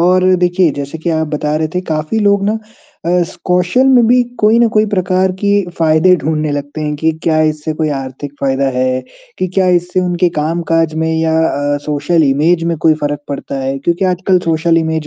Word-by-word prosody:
और 185 +1 +3
देखिए 180 -1 +2
जैसे 140 +3 -6
कि 170 +2 -2
आप 160 -1 0
बता 150 0 -2
रहे 155 0 -1
थे 180 - 0
काफ़ी 155 +8 -1
लोग 200 -1 +2
ना 215 +2 0 0.5
अ, - - -2
इस 170 - -3
कौशल 180 +8 +2
में 245 -3 +5
भी 245 +1 +4 0.2
कोई 215 +2 +4
ना 235 - +4
कोई 215 0 +3
प्रकार 185 -2 0
की 205 -1 +2
फ़ायदे 160 +3 +4
ढूँढने 155 -1 -2
लगते 145 +2 -5
हैं 150 -1 -2
कि 160 +2 0
क्या 155 -1 +2
इससे 155 0 -1
कोई 155 0 -1
आर्थिक 135 +1 -7
फ़ायदा 135 0 0
है, 130 0 0 0.4
कि 185 - 0
क्या 190 -1 +2
इससे 180 +1 -1
उनके 180 -1 +1
कामकाज 165 0 0
में 160 0 -1
या 160 0 +1
अ, 145 +1 -1
सोशल 150 +2 +1
इमेज 160 +5 +2
में 170 0 -1
कोई 160 0 +3
फ़र्क 145 0 -2
पड़ता 140 -1 -5
है, 135 +1 -2
क्योंकि 170 +6 -1
आजकल 185 0 +1
सोशल 165 +1 +2
इमेज 160 -1 -2
160 Hz, 205 wpm, -14 LUFS, 150-185 Hz, 0.5 s, में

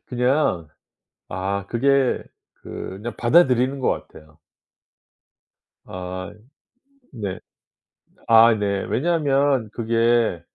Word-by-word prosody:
그냥 125 - 0 0.6
아 95 +1 -3
그게 135 +3 +1 0.4
그냥 105 +5 -7
받아들이는 130 -1 +3
것 130 - +1 0.2
같아요. 75 -1 -17 1.5
아 90 0 -7 0.8
네. 100 -7 -5 0.9
아 115 0 +7
네. 100 -2 -1
왜냐하면 140 -5 +1
그게 115 -4 +1
115 Hz, 150 characters per minute, -22 LUFS, 100-130 Hz, 1.5 s, 아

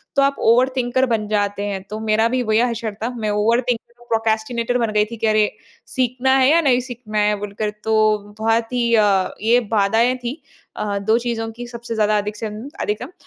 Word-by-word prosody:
तो 275 - +4
आप 275 0 +2
ओवरथिंकर 255 +1 +2
बन 215 -1 -4
जाते 205 -1 -1
हैं 195 -2 -4
तो 215 +1 -5
मेरा 220 +1 +3
भी 255 +1 0
वही 220 -1 +2
हशर 230 -3 -1
था, 230 - 0
मैं 230 -4 -3
ओवरथिंकर 230 +3 0 0.2
प्रोक्रास्टिनेटर 225 +2 0
बन 230 -3 0
गई 210 0 +3
थी 230 +2 -9
कि 225 - 0
अरे, 215 -1 +3 0.4
सीखना 255 0 0
है 260 0 +4
या 325 +3 +5
नहीं 260 -5 +3
सीखना 240 -4 -7
है 210 0 +2
बोलकर, 205 +1 -3
तो 215 -1 +3 0.2
बहुत 225 +2 0
ही 235 -1 +2
अ, 200 -3 +3
ये 230 +3 +4
बाधाएँ 225 +4 +3
थी 240 +1 -2 0.4
अ, 205 -1 -2
2 220 +3 +2
चीज़ों 230 -2 -3
की 240 +2 -8
सबसे 235 -1 -6
ज़्यादा 215 -1 +2
अधिक 210 0 -3
से 225 - -5 0.4
अधिकतम। 230 +8 -3
225 Hz, 195 wpm, -20 LUFS, 215-245 Hz, 0.4 s, या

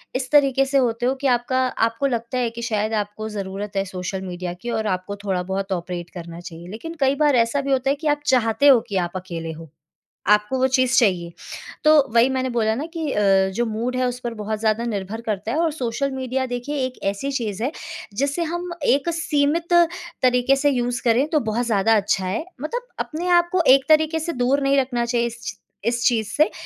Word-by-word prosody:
इस 255 0 -2
तरीके 275 -2 +4
से 275 +1 +1
होते 240 -2 +1
हो 260 +2 +2
कि 280 - +1
आपका 250 +1 +1 0.3
आपको 230 +5 -1
लगता 235 0 -2
है 245 -2 +1
कि 235 +1 -8
शायद 215 -2 -1
आपको 210 +1 -3
ज़रूरत 200 0 -5
है 195 - +1
सोशल 185 0 -5
मीडिया 180 -1 -5
की 240 - -5
और 220 -2 -1
आपको 185 +1 -2
थोड़ा 190 -2 0
बहुत 195 +1 -3
ऑपरेट 175 -1 -4
करना 170 -1 -8
चाहिए। 175 0 -10
लेकिन 230 - -7
कई 270 0 +3
बार 295 -2 +3
ऐसा 235 +4 +2
भी 275 0 -3
होता 265 0 +2
है 280 - +2
कि 305 +2 -5
आप 295 0 +1
चाहते 255 +1 +3
हो 265 -4 +8
कि 200 - -4
आप 175 - -7
अकेले 170 -3 -5
हों, 160 0 -10 0.7
आपको 210 +5 +2
वो 260 - +3
चीज़ 255 -1 +2
चाहिए। 180 -6 +2 0.5
तो 305 - +7 0.2
वही 235 +2 +6
मैंने 260 0 -1
बोला 220 -2 +1
ना 280 +7 -3
कि 315 -3 -2
अ, 195 -2 +3
जो 240 +2 0
मूड 230 +3 -2
है 255 0 +1
उस 245 0 -5
पर 235 -1 -3
बहुत 215 0 -3
ज़्यादा 220 +1 +1
निर्भर 210 0 -4
करता 215 -1 -3
है 295 - 0
और 330 -2 +1
सोशल 275 -1 -2
मीडिया 260 0 -2
देखिए 245 +4 -4
एक 255 - -9
ऐसी 275 +8 -4
चीज़ 220 -5 -3
है, 270 - -1 0.4
जिसे 280 +8 0
हम 350 0 -4
एक 280 +4 +2
सीमित 330 +1 0 0.5
तरीके 250 +1 +3
से 290 +1 +2
यूज़ 245 -1 -1
करें 240 +5 +3
तो 305 -3 +2
बहुत 235 +3 -1
ज़्यादा 225 0 +3
अच्छा 195 -2 0
है। 200 +11 -2 0.2
मतलब 485 - -4
अपने 335 +4 -3
आपको 345 +1 +1
एक 270 0 +2
तरीके 315 +1 +4
से 335 +2 -3
दूर 275 +3 +2
नहीं 275 0 +3
रखना 245 -2 -1
चाहिए 235 0 0
इस 235 0 -7 0.3
इस 235 0 0
चीज़ 225 -4 +2
से 305 +2 +4
240 Hz, 215 wpm, -22 LUFS, 210-275 Hz, 0.7 s, हो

